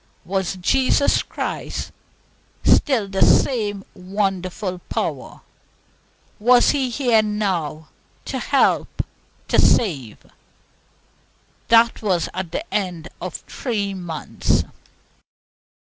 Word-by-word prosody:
Was 190 0 -1
Jesus 265 +9 +2
Christ - - -5 0.7
still 250 -9 +3
the 195 0 -3
same 205 -6 +3
wonderful 185 -1 -3
power? - - -3 1.0
Was 245 +3 +5
He 270 -3 0
here 240 -3 +3
now 185 -8 -2 0.4
to - - -3
help, - - +1 0.4
to - - +4
save? 140 - +2 1.5
That 230 0 +4
was 185 -6 0
at 185 -2 -4
the 310 - -3
end 175 -5 -2
of 180 -2 -5
three 205 -6 -2
months. 175 -4 -1
195 Hz, 90 wpm, -21 LUFS, 180-230 Hz, 1.5 s, Was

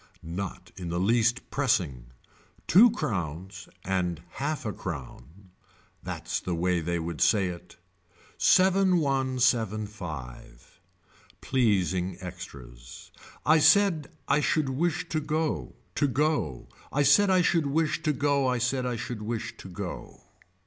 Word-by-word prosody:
Not 90 +3 -6
in 90 -2 -5
the 85 +1 -1
least 115 +5 +1
pressing. 90 - 0 0.6
Two 220 +8 +7
crowns 95 - -4 0.2
and 90 -3 0
a - - -16 0.2
half 145 -1 -2
a 105 - -2
crown. 80 +3 -8 0.5
That's - - -4
the 90 - -3
way 90 +1 +1
they 85 +2 -1
would 85 -1 -4
say 100 -4 +3
it. 90 0 -9 0.6
Seven 190 0 +4
one 135 -4 0
seven 115 -4 +2
five. 70 - -9 0.6
Pleasing 95 -7 +1
extras. 60 -9 -10 0.3
I 155 +1 +5
said 160 -1 +4 0.2
I 140 +1 +3
should 150 -1 +1
wish 160 +5 -1
to 155 - 0
go, 155 +1 -2 0.2
to 145 - +1
go, 125 - -1 0.2
I 145 - +2
said 195 +9 +5
I 185 -1 +4
should 165 -3 +2
wish 155 +2 0
to 155 -2 +1
go 140 -1 +1
I 125 0 +1
said 125 +2 0
I 125 - -1
should 115 -1 -5
wish 115 +2 -4
to 95 - -10
go. 90 0 -7
115 Hz, 140 wpm, -27 LUFS, 90-145 Hz, 0.6 s, Two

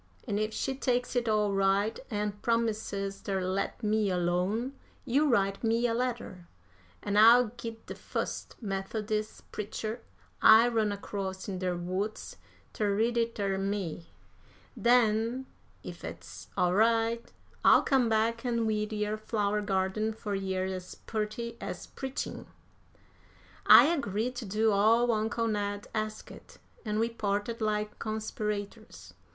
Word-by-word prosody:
An' 205 -2 0
if 215 0 -1
she 270 - -2
takes 250 -2 -1
it 240 -2 +1
all 210 -2 +2
right, 195 +2 +2
an' 210 -2 -1
promises 215 -4 -1
ter 195 -1 -2
let 190 +5 -2
me 215 -1 +2
alone, 180 +8 0 0.3
you 285 +4 +2
write 195 -4 +1
me 230 +1 +2
a 235 - +2
letter, 230 -7 -3 0.6
an' 205 0 0
I'll 230 +2 +7
git 230 -1 -8
de - - -6
fust - - -4
Methodis' 215 +2 -3
preacher 215 +2 -4 0.4
I 225 +2 +8
run 220 -3 +1
across 195 -2 -5
in 190 -2 -4
der 180 -1 -1
woods 190 - -4 0.4
ter 205 -2 0
read 230 +3 +1
it 230 0 0
ter 195 -2 -1
me. 195 -4 -3 0.7
Den, 235 +1 +2 0.4
ef - - -8
it's - - -9
all 180 0 +3
right, 230 +2 +2 0.3
I'll - - +7
come 260 -4 +3
back 225 +2 +1
an' 235 -2 0
weed 215 0 -1
yer 210 0 -1
flower 210 -1 -1
garden 200 +2 0
fur 210 -1 -5
yer 190 -1 -1
as 185 -1 -5
purty 225 +2 -4
as - - -5
preachin'." 265 0 -5 1.2
I - - +10
agreed 250 - 0
to 245 - -4
do 215 +3 +2
all 225 +4 +4
uncle 225 +1 0
Ned 205 -1 -2
asked, 215 0 -6 0.3
and 215 -2 -1
we 225 - +2
parted 220 0 -2
like 210 -1 -1
conspirators. 215 0 -5
215 Hz, 140 wpm, -30 LUFS, 200-230 Hz, 1.2 s, I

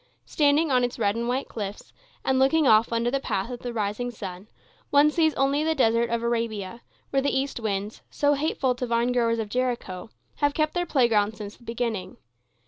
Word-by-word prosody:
Standing 295 +1 +2
on 250 -1 +3
its 245 0 -2
red 205 -3 +1
and 235 +1 -2
white 255 +3 -1
cliffs, 205 -2 -7 0.3
and 265 0 +2
looking 285 +3 +4
off 220 +1 +5
under 235 +1 0
the 275 - 0
path 215 -3 -2
of 245 - -6
the 245 - -5
rising 220 +2 -2
sun, 195 -4 -8 0.4
one 290 +1 +5
sees 315 -1 +2
only 275 +2 +1
the 320 0 +1
Desert 235 -3 +2
of 235 0 -1
Arabia, 230 -2 -2 0.3
where 275 - +2
the 280 - +1
east 275 -2 -3
winds, 205 -1 -3
so 290 0 +2
hateful 280 -3 0
to 250 0 -4
vinegrowers 235 0 +1
of 220 -2 -2
Jericho, 235 -5 -3 0.3
have 290 -1 +1
kept 310 -1 +1
their 350 0 -1
playgrounds 220 -7 +2
since 205 -1 -7
the - - -21
beginning. 230 -5 -3
240 Hz, 195 wpm, -25 LUFS, 220-275 Hz, 0.4 s, off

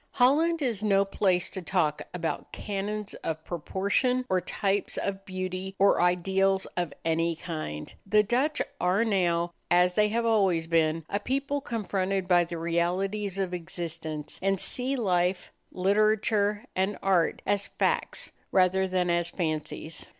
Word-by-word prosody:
Holland 305 +6 +3
is 230 -6 -1
no 200 -2 +3
place 190 -2 +1
to 190 - -5
talk 165 -4 0
about 170 -2 -4
canons 210 0 -4
of 160 0 -3
proportion 200 - 0
or 185 -1 +2
types 195 +2 -1
of 195 -1 -3
beauty 185 0 -4
or 200 -2 +4
ideals 190 +2 +2
of 175 -3 -1
any 165 +1 +1
kind. 155 - -6
The 210 +1 +5
Dutch 255 +8 +1 0.2
are 185 +6 +2
now, 175 -5 +1 0.2
as 180 +1 +4
they 210 +2 +3
have 230 +2 0
always 195 -7 +3
been, 165 -1 +1
a 200 - -1
people 275 +5 -1
confronted 195 -5 -2
by 175 -1 +4
the 170 0 -6
realities 180 +4 -1
of 190 -2 -1
existence, 165 -3 -4
and 195 0 +1
see 260 +7 -1
life, 180 -5 0 0.2
literature, 210 +2 +2
and 190 +2 0
art 185 -4 +2
as 200 0 +1
facts - - -1 0.2
rather 190 0 +3
than 180 -1 +1
as 170 0 +1
fancies. 160 -2 -4
190 Hz, 145 wpm, -28 LUFS, 175-205 Hz, 0.2 s, The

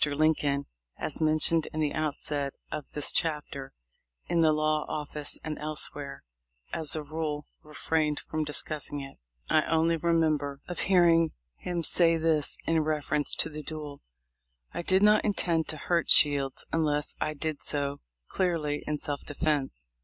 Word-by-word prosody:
Lincoln, 145 -1 +1 0.3
as - - -3
mentioned 155 +1 +2
in 155 - -4
the 150 -2 0
outset 145 -2 -2 0.2
of 150 - -5
this 150 - +1
chapter, 150 -4 -2 0.5
in 170 - +1
the 160 -1 +5
law 155 0 +1
office 150 -1 -3
and 155 -1 -4
elsewhere, 145 -2 -2 0.5
as 160 -2 +4
a 155 - -3
rule, 150 -1 -3 0.2
refrained 150 0 -1
from 155 0 -3
discussing 150 -1 -2
it. 135 - -10 0.3
I 155 - +4
only 165 +1 +2
remember 155 -4 +1
of 180 - -5
hearing 170 -3 +5 0.2
him 175 -2 -3
say 165 0 +4
this, 160 -2 +1
in 165 0 +2
reference 150 -1 0
to - - +3
the 155 0 -7
duel: 150 -2 -7 0.7
"I - - -3
did 190 +3 +3
not 210 0 +6
intend 170 -6 +1
to 155 - -2
hurt 170 +2 0
Shields 140 -3 +4
unless 150 -2 +1
I 155 - -1
did 155 0 -3
so 145 -1 -2 0.3
clearly 160 -5 -1
in 150 0 0
self 145 -1 -4
defense. 145 - -1
155 Hz, 150 wpm, -28 LUFS, 145-160 Hz, 0.7 s, not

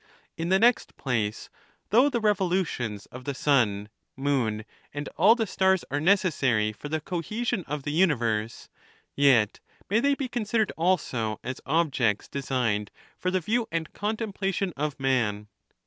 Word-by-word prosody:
In 165 +1 -3
the 190 - +5
next 235 +4 +2
place, 110 -5 -2 0.4
though 250 +7 +5
the 245 -4 -1
revolutions 180 - 0
of 125 +1 -9
the 140 +1 -4
sun, 115 -8 +2 0.3
moon, 125 -6 0 0.3
and 145 0 -5
all 210 +7 +6
the 225 -2 0
stars 190 -2 +2
are 145 - 0
necessary 140 - +2
for 145 +7 -9
the 160 +1 -1
cohesion 195 +7 -2
of 145 -1 -4
the 145 - -3
universe, 120 - +1 0.5
yet 130 -7 +4 0.3
may 215 - +4
they 280 +3 +2
be 275 -2 -3
considered 225 -3 0
also 130 -11 0
as 130 +1 -5
objects 135 -9 +1
designed 125 -7 -1 0.3
for 185 - -2
the 185 0 +1
view 225 +6 0
and 165 -1 -3
contemplation 200 -3 -2
of 145 0 -3
man. 115 -6 0
150 Hz, 145 wpm, -27 LUFS, 120-195 Hz, 0.5 s, all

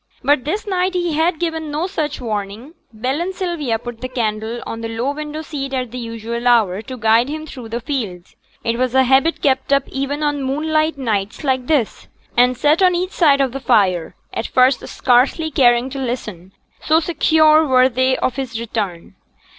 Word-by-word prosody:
But 280 0 +2
this 385 +8 -2
night 370 -2 0
he 350 -2 0
had 325 +2 +1
given 320 -2 -2
no 300 +4 -2
such 310 -6 -3
warning. 215 +3 -5 0.2
Bell 255 +7 -2
and 370 +2 -3
Sylvia 330 -11 -2
put 235 0 -9
the 255 - -4
candle 225 -1 -2
on 230 - -6
the 225 - -3
low 230 +5 -2
window 300 +1 -6
seat 275 -3 -5
at 250 -3 -3
the 250 - -6
usual 230 +1 -4
hour 215 -5 +3
to 255 +2 -8
guide 225 +3 +3
him 310 +1 -5
through 250 -6 -9
the 235 +1 -3
fields 220 -10 -5 0.3
it 230 0 -1
was 255 0 0
a 265 - +6
habit 270 +6 +2
kept 265 -1 +1
up 275 -1 +4
even 275 +2 -3
on 290 -1 0
moonlight 310 +3 0
nights 215 -2 -2
like 260 -3 0
this 285 -9 0 0.3
and 250 +1 +3
sate 300 +7 +3
on 365 -1 +4
each 365 +2 -2
side 285 -5 +3
of 265 -2 +1
the 270 - -5
fire, 190 -10 +1 0.2
at 225 - -3
first 255 +1 +2
scarcely 265 +6 +2
caring 240 -2 +3
to 275 - -5
listen, 215 -8 -5 0.3
so 315 +1 +4
secure 315 -1 +4
were 255 -1 +5
they 260 +1 +1
of 255 - -1
his 245 -4 -4
return. 205 -7 -4
260 Hz, 195 wpm, -19 LUFS, 230-305 Hz, 0.3 s, a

